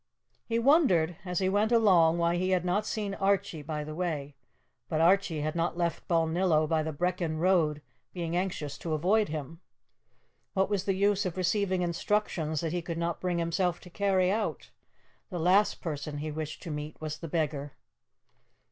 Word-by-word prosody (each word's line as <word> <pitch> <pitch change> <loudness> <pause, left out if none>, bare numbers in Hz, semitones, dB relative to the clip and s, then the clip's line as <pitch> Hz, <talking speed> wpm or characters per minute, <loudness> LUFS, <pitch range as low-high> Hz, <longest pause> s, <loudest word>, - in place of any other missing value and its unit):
He 230 - 0
wondered, 230 - +4
as 180 -1 -3
he 190 - +2
went 205 +4 +2
along, 180 -8 +5
why 170 0 +2
he 185 +1 0
had 180 -1 +1
not 205 +4 0
seen 205 -2 -2
Archie 195 -4 0
by 150 0 -4
the 155 +1 -7
way; 155 -5 -3 0.5
but 155 - 0
Archie 170 -2 +3
had 155 +1 -1
not 170 0 -1
left 170 -1 -2
Balnillo 165 -1 +2
by 160 0 +1
the 160 +1 -3
Brechin 170 0 -1
road, 160 -4 +2 0.3
being 170 -2 -3
anxious 175 -6 -2
to 165 - -3
avoid 200 +6 +2
him. 155 +2 -6 0.9
What 195 +1 +1
was 200 -2 0
the 195 - +1
use 200 +1 +2
of 180 - -6
receiving 185 0 +1
instructions 170 -3 -1
that 165 -1 -2
he 175 - -1
could 165 0 -5
not 170 0 -2
bring 180 -1 0
himself 170 +1 0
to 180 - -13
carry 190 -1 +2
out? 215 +1 -2 0.6
The 180 - -4
last 185 +5 +3
person 150 -3 -4
he 155 +1 -4
wished 155 0 -5
to 165 - -5
meet 150 +1 -6
was 155 -1 -5
the 165 - -6
beggar. 145 -3 -2
175 Hz, 180 wpm, -29 LUFS, 160-190 Hz, 0.9 s, along